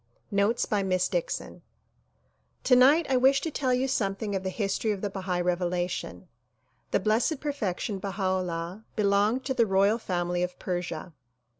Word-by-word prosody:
Notes 200 +4 +2
by 210 -3 0
Miss 185 -2 +1
Dixon - - -3 1.0
TONIGHT 270 +6 +6
I 265 - +2
wish 265 +2 +5
to 325 - -3
tell 265 -3 0
you 250 +1 +1
something 205 -4 -1
of 190 - -1
the 190 - -3
history 200 +2 -1
of 205 -3 -1
the 205 - -2
Bahai 185 -2 -2
Revelation. 180 +1 -2 0.6
The - - +2
Blessed 225 - +1
Perfection 215 -8 -3
Baha 195 +1 -4
'Ullah 185 +1 -2
belonged 210 +4 +2
to 265 - 0
the 235 -3 +2
royal 200 +4 +3
family 175 -3 -1
of 180 0 -2
Persia. 175 -1 -4
200 Hz, 155 wpm, -27 LUFS, 185-250 Hz, 1.0 s, TONIGHT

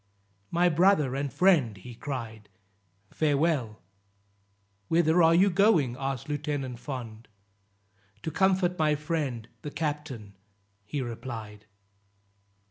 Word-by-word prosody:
"My 175 +1 +3
brother 170 -5 +3
and 140 0 -2
friend," 155 - +3
he 120 +6 -10
cried, 115 -5 -6 0.6
"farewell." 145 - 0 1.0
"Whither 165 +1 +3
are 165 0 +6
you 190 +3 +5
going?" 170 - +3
asked 135 -1 -4
Lieutenant 145 -4 -3
Fond. 120 -4 -7 1.0
"To 160 - -3
comfort 185 -1 +2
my 155 -1 +3
friend, 145 -7 -3
the 150 - -5
captain," 145 -10 -4 0.5
he 135 +6 -3
replied. 110 -3 -7
145 Hz, 105 wpm, -28 LUFS, 120-165 Hz, 1.0 s, are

